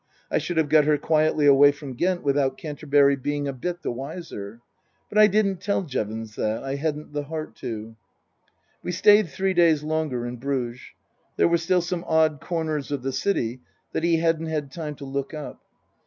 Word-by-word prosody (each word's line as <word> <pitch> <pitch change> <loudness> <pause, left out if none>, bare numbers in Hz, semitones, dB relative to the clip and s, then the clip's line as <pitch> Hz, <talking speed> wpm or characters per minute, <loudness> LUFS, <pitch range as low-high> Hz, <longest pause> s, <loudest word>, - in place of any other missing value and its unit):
I - - +2
should 175 - -4
have 160 -2 +3
got 150 0 +5
her 150 0 +3
quietly 155 0 +2
away 145 0 +7
from 145 -2 -8
Ghent 175 +7 0
without 140 -1 +1
Canterbury 145 -2 +2
being 145 +1 -2
a 140 - -2
bit 175 +7 -5
the - - -1
wiser. 120 - -7 0.5
But 210 - +1
I 215 - +9
didn't 195 -3 +1
tell 200 +1 0
Jevons 110 - -4
that. 110 +3 -1
I 135 0 -3
hadn't 150 +1 -3
the 145 -1 -3
heart 155 -4 -5
to. 110 0 -6 0.9
We 180 - -4
stayed 205 +1 +5
three 190 +6 -1
days 165 -4 +4
longer 155 -6 -1
in 120 0 -5
Bruges. 125 -1 -3 0.6
There - - +4
were 170 0 +2
still 180 +2 +2
some 175 0 -3
odd 160 -2 +2
corners 160 -4 -3
of 140 -3 -2
the 135 0 -2
city 130 - -1 0.3
that - - -2
he 170 -1 +3
hadn't 165 0 +1
had 150 -3 -3
time 150 -1 -5
to 140 - -9
look 140 +2 -4
up. 150 -2 -8
150 Hz, 190 wpm, -24 LUFS, 135-165 Hz, 0.9 s, I